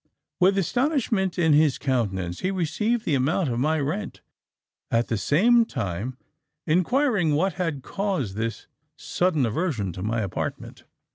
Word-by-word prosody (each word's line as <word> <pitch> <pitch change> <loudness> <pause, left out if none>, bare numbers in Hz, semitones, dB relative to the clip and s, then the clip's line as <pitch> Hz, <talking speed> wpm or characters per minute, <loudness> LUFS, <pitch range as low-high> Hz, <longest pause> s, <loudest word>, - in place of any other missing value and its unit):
"With 195 +2 +4
astonishment 225 - 0
in 160 -3 +3
his 150 -2 +4
countenance, 95 -9 -1
he 185 - -1
received 195 +6 -1
the 155 - 0
amount 140 +5 +1
of 120 -1 -1
my 155 +4 +1
rent, 140 -6 -3 0.7
at 115 +1 +1
the 115 - +1
same 210 - +4
time 120 - -4 0.5
inquiring 180 - +2
what 185 +5 +1
had 150 -7 -2
caused 190 - -2
this 115 +1 -3 0.3
sudden 175 -7 0
aversion 115 - -2
to 90 - -7
my 110 +3 -1
apartment. 100 -3 -5
155 Hz, 140 wpm, -25 LUFS, 115-190 Hz, 0.7 s, With